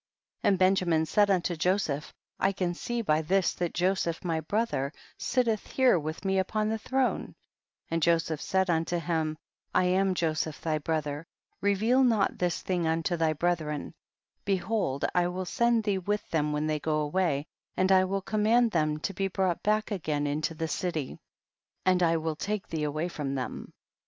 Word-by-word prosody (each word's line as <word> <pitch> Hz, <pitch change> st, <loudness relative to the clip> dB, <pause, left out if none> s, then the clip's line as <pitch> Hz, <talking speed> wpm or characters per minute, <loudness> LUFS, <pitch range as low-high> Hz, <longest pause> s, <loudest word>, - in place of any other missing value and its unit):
And 195 Hz, -, +3 dB
Benjamin 180 Hz, -4 st, +3 dB
said 205 Hz, +5 st, +3 dB
unto 180 Hz, -2 st, +1 dB
Jo 180 Hz, +4 st, +2 dB
seph, 150 Hz, -6 st, -3 dB, 0.3 s
I 195 Hz, -, +2 dB
can 180 Hz, -2 st, -1 dB
see 235 Hz, +6 st, -3 dB
by 155 Hz, -5 st, +2 dB
this 185 Hz, +4 st, +2 dB
that 175 Hz, -2 st, -2 dB
Joseph 180 Hz, -2 st, 0 dB
my 165 Hz, -2 st, 0 dB
brother 160 Hz, -5 st, -1 dB, 0.3 s
sitteth 235 Hz, -4 st, 0 dB
here 255 Hz, -9 st, +3 dB
with 155 Hz, +5 st, -5 dB
me 190 Hz, 0 st, +2 dB
upon 215 Hz, +3 st, 0 dB
the 220 Hz, 0 st, -1 dB
throne, 260 Hz, +3 st, -1 dB, 0.6 s
and 165 Hz, 0 st, 0 dB
Joseph 165 Hz, -2 st, +2 dB
said 190 Hz, -1 st, +1 dB
unto 165 Hz, 0 st, +1 dB
him, 160 Hz, -2 st, -1 dB, 0.4 s
I -, -, +5 dB
am 185 Hz, +1 st, +2 dB
Joseph 155 Hz, -2 st, -1 dB
thy 155 Hz, -2 st, -1 dB
brother, 150 Hz, 0 st, -2 dB, 0.3 s
reveal 220 Hz, +6 st, +3 dB
not 225 Hz, -6 st, +2 dB
this 180 Hz, -1 st, -1 dB
thing 175 Hz, -3 st, 0 dB
unto 165 Hz, +2 st, 0 dB
thy 160 Hz, -2 st, +1 dB
brethren; 155 Hz, -2 st, -1 dB, 0.5 s
behold 195 Hz, -7 st, 0 dB
I 175 Hz, -1 st, +3 dB
will 185 Hz, +1 st, -3 dB
send 235 Hz, +3 st, +2 dB
thee 200 Hz, -3 st, 0 dB
with 205 Hz, +3 st, -2 dB
them 150 Hz, -2 st, +1 dB
when 150 Hz, +1 st, -1 dB
they 155 Hz, -1 st, 0 dB
go 155 Hz, +1 st, 0 dB
away, 150 Hz, -2 st, 0 dB, 0.3 s
and 185 Hz, +1 st, +3 dB
I 185 Hz, 0 st, +6 dB
will 195 Hz, +1 st, -2 dB
command 220 Hz, +3 st, +3 dB
them 155 Hz, -3 st, +1 dB
to 195 Hz, -, -2 dB
be 195 Hz, +1 st, -1 dB
brought 185 Hz, -2 st, 0 dB
back 215 Hz, +1 st, +1 dB
again 155 Hz, -7 st, -1 dB
into 150 Hz, +2 st, -1 dB
the 160 Hz, +1 st, -2 dB
city, 155 Hz, -3 st, -3 dB, 0.7 s
and 185 Hz, -1 st, +3 dB
I 165 Hz, -1 st, +3 dB
will 160 Hz, -1 st, -2 dB
take 210 Hz, +5 st, -3 dB
thee 155 Hz, -2 st, -2 dB
away 155 Hz, +3 st, -1 dB
from 145 Hz, -5 st, -4 dB
them. 130 Hz, -1 st, -5 dB
175 Hz, 175 wpm, -28 LUFS, 155-195 Hz, 0.7 s, I